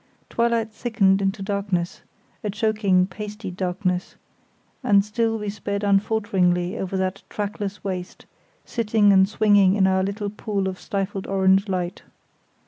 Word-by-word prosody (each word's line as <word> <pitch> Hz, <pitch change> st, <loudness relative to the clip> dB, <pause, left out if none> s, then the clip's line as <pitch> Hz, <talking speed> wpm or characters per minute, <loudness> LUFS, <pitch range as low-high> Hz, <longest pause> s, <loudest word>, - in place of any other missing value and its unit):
Twilight 230 Hz, -1 st, +1 dB
thickened 200 Hz, -4 st, +2 dB
into 195 Hz, +1 st, -1 dB
darkness—a 200 Hz, +2 st, -4 dB
choking, 210 Hz, -3 st, +2 dB
pasty 210 Hz, +1 st, -7 dB
darkness—and 185 Hz, +3 st, -2 dB
still 225 Hz, +1 st, 0 dB
we 210 Hz, -1 st, -5 dB
sped 200 Hz, 0 st, -3 dB
unfalteringly 195 Hz, -3 st, +1 dB
over 190 Hz, 0 st, -3 dB
that 190 Hz, +1 st, -2 dB
trackless 205 Hz, -1 st, -4 dB
waste, 185 Hz, -2 st, -5 dB, 0.4 s
sitting 215 Hz, -3 st, +3 dB
and 190 Hz, 0 st, +5 dB
swinging 205 Hz, -3 st, +4 dB
in 195 Hz, -2 st, +3 dB
our 190 Hz, 0 st, +3 dB
little 200 Hz, +1 st, -3 dB
pool 205 Hz, -2 st, -2 dB
of 185 Hz, -1 st, -4 dB
stifled 195 Hz, -1 st, -3 dB
orange 195 Hz, +1 st, +3 dB
light. 180 Hz, -1 st, -2 dB
200 Hz, 125 wpm, -23 LUFS, 190-210 Hz, 0.4 s, and